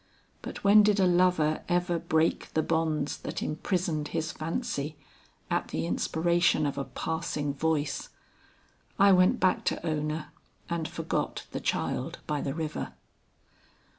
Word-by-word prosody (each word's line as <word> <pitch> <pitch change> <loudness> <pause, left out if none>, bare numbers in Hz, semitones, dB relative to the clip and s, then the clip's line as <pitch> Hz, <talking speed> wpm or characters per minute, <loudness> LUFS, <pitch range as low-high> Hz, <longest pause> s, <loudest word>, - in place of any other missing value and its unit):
But - - -7
when 205 +1 +8
did 210 -1 +3
a 190 - +5
lover 175 -4 +3
ever 175 -1 +1
break 160 +1 0
the 155 - +3
bonds 155 -3 0
that - - -4
imprisoned 160 -1 -1
his 160 0 -2
fancy, 155 - -3 0.5
at - - 0
the 80 - -2
inspiration 165 - +2
of 140 - -1
a 135 - -2
passing 155 -3 -2
voice. 150 0 -1 0.9
I 200 0 +6
went 185 0 +5
back 185 0 +2
to - - 0
Ona 155 -1 -2 0.4
and 165 -2 -1
forgot - - -3
the - - -3
child - - -1
by 150 -1 -1
the 135 0 -3
river. 155 -2 -4
160 Hz, 135 wpm, -29 LUFS, 150-175 Hz, 0.9 s, when